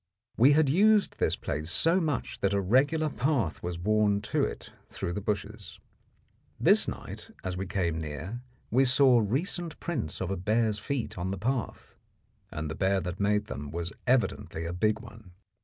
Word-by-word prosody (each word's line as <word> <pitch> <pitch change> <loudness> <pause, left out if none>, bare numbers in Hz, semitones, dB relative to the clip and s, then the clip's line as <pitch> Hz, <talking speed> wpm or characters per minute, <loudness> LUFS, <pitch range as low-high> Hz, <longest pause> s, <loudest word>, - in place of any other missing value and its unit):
We 130 +6 +6
had 155 0 +4
used 205 +8 +3
this - - +2
place 75 +3 -4
so 165 - +3
much 150 -5 -2
that 100 0 +1
a - - +2
regular 140 - +2
path 135 - -1
was 85 -1 -4
worn 105 +2 +2
to - - +3
it - - -4 0.2
through 85 - -4
the 105 - -3
bushes. 105 0 -4 0.8
This - - +4
night - - -7
as 95 -1 -3
we 95 +1 -4
came 85 -4 -1
near 80 +10 -6 0.3
we 130 +4 +4
saw 130 -1 +5
recent 155 - -2
prints 135 - -3
of 95 0 -2
a 95 - -1
bear's 110 +3 +1
feet 120 -4 -3
on 90 +2 -2
the 100 - -3
path, 120 +5 -3 0.5
and 75 +1 -4
the 80 - -4
bear 95 +3 +1
that 90 0 -5
made 105 +1 +1
them 75 -8 -6
was 85 +5 -4
evidently 120 -9 0
a 85 - -3
big 105 +4 +1
one. 110 -5 -14
105 Hz, 175 wpm, -28 LUFS, 90-130 Hz, 0.8 s, We